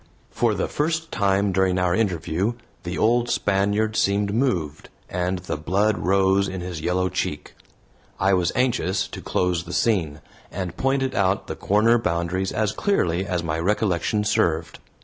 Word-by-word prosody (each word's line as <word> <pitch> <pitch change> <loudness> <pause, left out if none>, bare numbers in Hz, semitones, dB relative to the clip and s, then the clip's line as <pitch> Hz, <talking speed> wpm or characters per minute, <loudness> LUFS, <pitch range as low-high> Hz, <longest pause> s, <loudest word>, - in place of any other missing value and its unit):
For - - +1
the - - -1
first 160 +2 -2
time 100 0 +1
during 95 0 +2
our 90 -1 +1
interview 90 +1 0 0.3
the 90 -1 -5
old 120 +2 +2
Spaniard 100 +2 +1
seemed 100 -1 +1
moved, 90 - -1 0.2
and 90 +1 -1
the 90 -3 -4
blood 100 +7 +1
rose 95 +1 +2
in 95 - -5
his 90 -3 -5
yellow 90 +3 0
cheek. - - -4 0.7
I 95 0 +3
was 90 -2 +2
anxious 100 -7 +1
to - - -8
close 90 -2 0
the 90 +1 -8
scene, 85 -11 +1 0.3
and 90 -2 -4
pointed 135 +2 0
out 95 0 +1
the - - -5
corner 110 +4 +3
boundaries 90 -1 -1
as 110 -2 0
clearly 95 - 0
as 90 -3 -1
my 80 -1 -2
recollection 105 +2 0
served. 80 -5 0
95 Hz, 155 wpm, -23 LUFS, 90-105 Hz, 0.7 s, I